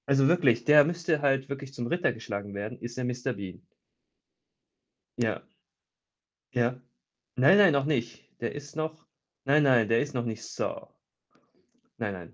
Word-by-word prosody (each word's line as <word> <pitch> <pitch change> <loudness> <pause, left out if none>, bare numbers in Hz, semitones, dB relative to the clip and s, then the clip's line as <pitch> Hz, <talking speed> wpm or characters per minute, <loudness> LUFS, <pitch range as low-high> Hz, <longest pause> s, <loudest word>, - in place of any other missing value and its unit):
Also 135 -1 +4
wirklich, 130 -9 +3
der 150 +1 +8
müsste 165 -2 -1
halt 135 -1 +1
wirklich 140 -1 -7
zum 120 -3 -4
Ritter 175 +2 +1
geschlagen 100 -3 -6
werden, 100 +2 -5
ist 120 +1 -8
ja 130 - -2
Mister 125 +1 -2
Bean? 95 -4 -8 1.6
Ja. - - -1 1.1
Ja. 125 0 0 0.6
Nein, 145 +11 +6
nein, 195 -5 +7
noch 140 -1 +1
nicht. 125 -6 -2 0.2
Der 120 - -3
ist 145 +1 -10
noch 155 +1 -4 0.4
nein, 145 +3 +4
nein, 125 -6 +4
der 115 0 +3
ist 145 0 -6
noch 120 -2 -1
nicht 115 -2 -5
Sir. - - -5 1.1
Nein, 105 -3 -2
nein. 90 -3 -10
130 Hz, 155 wpm, -28 LUFS, 115-145 Hz, 1.6 s, der